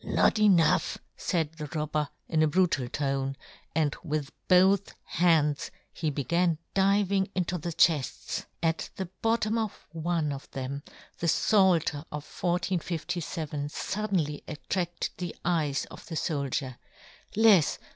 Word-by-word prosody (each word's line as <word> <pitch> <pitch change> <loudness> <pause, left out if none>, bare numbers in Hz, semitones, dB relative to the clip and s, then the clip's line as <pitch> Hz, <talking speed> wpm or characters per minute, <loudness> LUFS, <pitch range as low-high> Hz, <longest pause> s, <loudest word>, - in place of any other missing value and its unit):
" - - -24
Not 215 - +2
enough," 190 -6 +4 0.2
faid 160 -3 -1
the 150 - -4
robber, 150 -1 -1 0.2
in 160 -2 +1
a 155 - +5
brutal 165 -6 +2
tone, 135 -1 -1 0.4
and 155 -3 +2
with 150 -3 -2 0.2
both 190 +2 +4
hands 160 -4 +2 0.2
he 160 - -1
began 170 +4 +1 0.2
diving 195 0 +3
into 180 -1 -1
the 170 +3 -3
chefts. 155 -5 +1 0.2
At 165 0 0
the 190 -2 -4
bottom 225 0 +1
of 215 -3 -4
one 165 -2 -1
of 140 0 -7
them 135 +1 -4 0.4
the 170 - -1
Pfalter 175 -6 +3
of 150 0 -5
1 - - -18 0.5
457 160 -3 -3
fuddenly 185 -5 -2
attracted 175 +3 -3
the 175 -2 -4
eyes 155 -5 +1
of - - -11
the 165 - -5
foldier; 140 -5 -2 0.6
lefs. 210 -7 +5
165 Hz, 135 wpm, -28 LUFS, 150-185 Hz, 0.6 s, a